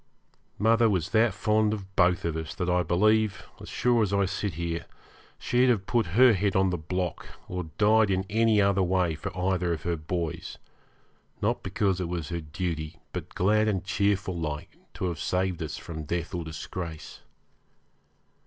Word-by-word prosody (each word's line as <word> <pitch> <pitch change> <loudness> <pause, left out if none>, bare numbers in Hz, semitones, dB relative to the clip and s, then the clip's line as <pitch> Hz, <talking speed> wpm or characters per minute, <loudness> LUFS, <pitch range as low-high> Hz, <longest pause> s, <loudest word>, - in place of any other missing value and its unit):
Mother 115 +2 +4
was 90 -3 0
that 115 +1 +4
fond 105 +2 +1
of 95 -2 -11
both 90 -2 +3
of 85 -2 -1
us 80 -1 -5
that 90 - -2
I 90 0 +3
believe, 105 +4 +2
as - - -9
sure 120 -2 +2
as 105 -3 +1
I 100 -1 +2
sit 95 -2 -3
here, 85 0 -3 0.5
she'd 125 +1 +2
have 105 -6 +2
put 115 -3 +1
her 125 -1 +8
head 100 0 0
on 95 -1 +3
the 90 - -1
block, 90 +2 -3 0.2
or 90 -1 -4
died 110 0 +4
in 95 0 0
any 110 0 +3
other 100 -1 +3
way 90 -2 +1
for 80 +5 -5
either 90 -1 0
of 80 - -5
her 85 -1 -1
boys, 80 0 -4 0.8
not - - 0
because 95 -3 0
it 85 - -3
was 85 -2 -3
her 85 -1 -3
duty, 80 0 -4 0.2
but - - -6
glad 105 +4 +3
and 100 -3 0
cheerful 100 -1 0
like, 75 -3 -4 0.2
to - - -3
have 85 -4 -2
saved 90 -1 -1
us 80 - -4
from 80 -2 -7
death 85 +3 -3
or 85 -1 -2
disgrace. 80 +1 -7
95 Hz, 180 wpm, -27 LUFS, 85-105 Hz, 0.8 s, her